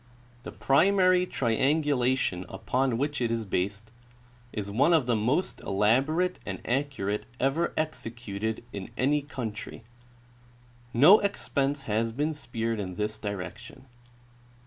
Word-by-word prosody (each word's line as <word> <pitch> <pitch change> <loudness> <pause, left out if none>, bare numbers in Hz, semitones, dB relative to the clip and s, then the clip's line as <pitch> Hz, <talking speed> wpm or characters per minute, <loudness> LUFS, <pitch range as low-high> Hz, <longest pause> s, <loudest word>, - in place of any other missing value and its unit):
The - - -8
primary 185 +4 +3
triangulation 130 - +1
upon 130 -2 -1
which 145 +1 -1
it 120 - +1
is 115 -1 -1
based 100 +3 -2 0.6
is 100 -1 -4
one 140 +11 +3
of 155 -6 +4
the 120 -1 +1
most 125 - 0
elaborate 135 - +1
and 95 -2 -5
accurate 120 -6 -1
ever 135 +6 +1
executed 115 -8 -3
in 100 -2 -6
any 145 +3 +2
country. 115 -6 -6 1.1
No 150 - +7
expense 140 -8 -1
has 115 0 0
been 150 +5 -1
spared 115 -6 -3
in 90 -3 -4
this 105 +1 -3
direction. 100 +3 -7
125 Hz, 120 wpm, -28 LUFS, 110-145 Hz, 1.1 s, No